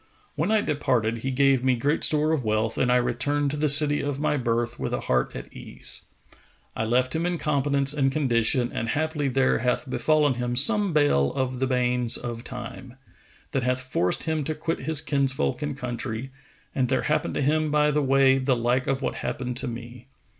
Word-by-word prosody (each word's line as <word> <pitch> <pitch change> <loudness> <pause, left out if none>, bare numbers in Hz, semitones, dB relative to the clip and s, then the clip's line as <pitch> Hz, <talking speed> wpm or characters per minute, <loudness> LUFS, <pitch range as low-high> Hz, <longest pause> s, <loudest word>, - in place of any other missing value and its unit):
When 165 +6 -1
I 220 -1 +3
departed, 120 - 0
he 130 - -3
gave 135 -1 +2
me 130 -1 +3
great 145 +6 0
store 155 0 +4
of 155 -5 0
wealth 110 +1 0
and 125 - +1
I - - +4
returned 130 +4 0
to - - -3
the 150 0 +1
city 145 +1 +4
of 140 -1 -3
my 150 0 +1
birth 120 -2 -1
with - - -2
a - - -4
heart 65 0 0
at - - -8
ease. - - -7 0.7
I 110 - -1
left 125 +4 +1
him 160 - 0
in 175 0 -1
competence 140 -2 0
and 135 -2 +1
condition, 125 -3 +1
and 115 - -3
haply 150 +1 -1
there 135 0 +2
hath 125 +2 -1
befallen 150 +2 +2
him 120 0 -3
some 205 - +3
bale 145 - +2
of 130 -2 -2
the 130 - 0
banes 125 -2 +1
of 120 -1 -6
Time, 125 0 -8 0.6
that 135 - 0
hath 125 +1 -1
forced 90 -8 0
him 160 -2 -1
to 155 - -2
quit 165 +2 -3
his 150 +2 0
kinsfolk 140 -1 0
and 145 -2 -3
country, 120 0 -5 0.4
and 130 -2 0
there 130 - +1
happened 150 0 -1
to - - -1
him 155 +2 +1
by 150 0 +2
the 150 +1 +1
way 135 -1 +4
the 130 -1 +1
like 120 +2 0
of 135 0 -1
what - - -1
happened 125 -3 -3
to 130 - -2
me. 120 +1 -8
130 Hz, 205 wpm, -25 LUFS, 125-150 Hz, 0.7 s, store